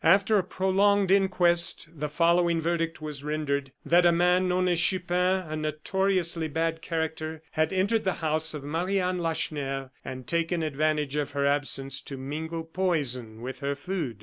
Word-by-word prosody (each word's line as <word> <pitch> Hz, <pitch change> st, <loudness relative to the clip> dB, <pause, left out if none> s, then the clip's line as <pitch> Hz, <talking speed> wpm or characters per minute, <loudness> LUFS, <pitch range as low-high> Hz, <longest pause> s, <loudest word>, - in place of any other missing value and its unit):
After 195 Hz, +5 st, +4 dB
a -, -, 0 dB
prolonged 190 Hz, +1 st, +2 dB
inquest 180 Hz, -4 st, +4 dB
the 150 Hz, -1 st, -4 dB
following 170 Hz, +2 st, +2 dB
verdict 165 Hz, -1 st, -2 dB
was 150 Hz, -2 st, -5 dB
rendered: 145 Hz, -3 st, -2 dB
"That 175 Hz, +1 st, +4 dB
a 175 Hz, -, +6 dB
man 180 Hz, +2 st, +3 dB
known 180 Hz, 0 st, +1 dB
as 175 Hz, -2 st, +2 dB
Chupin, 180 Hz, +1 st, +1 dB
a 155 Hz, -, -4 dB
notoriously 170 Hz, +2 st, -1 dB
bad 165 Hz, +1 st, -1 dB
character, 160 Hz, -1 st, -3 dB
had 155 Hz, 0 st, 0 dB
entered 200 Hz, +4 st, +1 dB
the 190 Hz, -, +1 dB
house 160 Hz, 0 st, -1 dB
of 145 Hz, -, -6 dB
Marie 175 Hz, +7 st, -1 dB
Anne 180 Hz, 0 st, -1 dB
Lacheneur, 140 Hz, -5 st, -2 dB
and 130 Hz, -1 st, -7 dB
taken 165 Hz, +4 st, 0 dB
advantage 150 Hz, -1 st, 0 dB
of 145 Hz, -1 st, -2 dB
her 140 Hz, 0 st, 0 dB
absence 140 Hz, -1 st, 0 dB
to 135 Hz, -, -7 dB
mingle 160 Hz, +5 st, -4 dB
poison 140 Hz, -11 st, -1 dB
with 130 Hz, +1 st, -6 dB
her 140 Hz, 0 st, -2 dB
food." 145 Hz, -, -4 dB
165 Hz, 165 wpm, -27 LUFS, 150-180 Hz, -, a